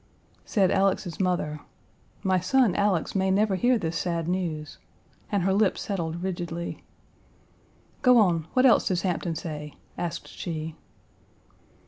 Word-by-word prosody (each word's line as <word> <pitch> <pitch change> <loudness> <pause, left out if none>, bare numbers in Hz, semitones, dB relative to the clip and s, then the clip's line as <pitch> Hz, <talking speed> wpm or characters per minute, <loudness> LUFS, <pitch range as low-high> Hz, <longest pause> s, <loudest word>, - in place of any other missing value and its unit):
Said 195 -4 +2
Alex's 190 -4 +1
mother: 175 -5 0 0.6
"My 190 -1 +2
son, 230 +3 +3
Alex, 200 -5 +1
may 190 -1 +1
never 200 +1 +2
hear 245 +6 +3
this 165 -5 -3
sad 170 -2 -2
news," 170 -4 -3 0.5
and 200 -4 +1
her 190 +1 +2
lip 200 -1 +2
settled 170 -4 -3
rigidly. 170 -2 -4 1.2
"Go 250 -1 +6
on; 170 -7 +3
what 255 +1 +4
else 250 - +5
does 180 -4 0
Hampton 175 -2 -1
say?" 150 -2 -6 0.2
asked 170 -1 -4
she. 160 -1 -5
180 Hz, 130 wpm, -26 LUFS, 165-195 Hz, 1.2 s, Go